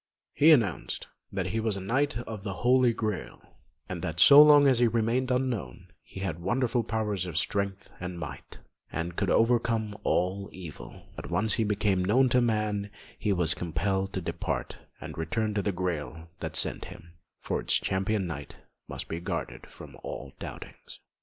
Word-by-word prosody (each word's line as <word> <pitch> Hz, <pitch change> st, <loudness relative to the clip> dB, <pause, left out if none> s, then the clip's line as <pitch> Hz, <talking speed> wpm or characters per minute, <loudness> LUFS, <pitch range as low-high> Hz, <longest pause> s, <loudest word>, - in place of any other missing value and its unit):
He 155 Hz, -, +5 dB
announced 115 Hz, -, +2 dB, 0.3 s
that 95 Hz, -2 st, -2 dB
he 95 Hz, +4 st, -1 dB
was 110 Hz, -3 st, 0 dB
a -, -, -3 dB
knight 130 Hz, +7 st, 0 dB
of 110 Hz, -4 st, -7 dB
the 100 Hz, -1 st, -4 dB
Holy 125 Hz, -1 st, +5 dB
Grail, 110 Hz, -4 st, -3 dB, 0.5 s
and -, -, -5 dB
that 80 Hz, +1 st, -4 dB
so 145 Hz, +1 st, +10 dB
long 145 Hz, -1 st, +8 dB
as 130 Hz, -3 st, +4 dB
he 120 Hz, -, +5 dB
remained 115 Hz, +3 st, +1 dB
unknown, 125 Hz, -, -2 dB
he 95 Hz, -, -10 dB
had 90 Hz, -4 st, -3 dB
wonderful 120 Hz, +6 st, 0 dB
powers 105 Hz, -4 st, -2 dB
of 85 Hz, -, -4 dB
strength 100 Hz, +1 st, -2 dB
and 90 Hz, 0 st, -5 dB
might, 70 Hz, -5 st, -8 dB, 0.3 s
and 85 Hz, +1 st, -3 dB
could -, -, 0 dB
overcome 115 Hz, -2 st, +2 dB
all 95 Hz, +3 st, 0 dB
evil; 85 Hz, -5 st, -10 dB
but -, -, -7 dB
once 110 Hz, -1 st, +1 dB
he 115 Hz, -, +1 dB
became 105 Hz, -3 st, +1 dB
known 125 Hz, +7 st, +4 dB
to 125 Hz, 0 st, +3 dB
man 105 Hz, -3 st, 0 dB, 0.3 s
he 105 Hz, -, 0 dB
was 90 Hz, -3 st, +2 dB
compelled 95 Hz, +3 st, -1 dB
to 95 Hz, -, -2 dB
depart 85 Hz, -, -3 dB, 0.2 s
and -, -, -8 dB
return 105 Hz, +7 st, -1 dB
to 105 Hz, -, 0 dB
the 100 Hz, -, 0 dB
Grail 85 Hz, -3 st, -4 dB
that -, -, -5 dB
sent -, -, +1 dB
him, 85 Hz, +1 st, -12 dB, 0.3 s
for -, -, -2 dB
its -, -, 0 dB
Champion 95 Hz, +1 st, 0 dB
Knight 75 Hz, -4 st, -6 dB, 0.3 s
must -, -, -6 dB
be 80 Hz, -, -4 dB
guarded 85 Hz, -, -5 dB
from -, -, -12 dB
all 70 Hz, -1 st, -7 dB
doubtings. -, -, -9 dB
100 Hz, 175 wpm, -28 LUFS, 90-115 Hz, 0.5 s, so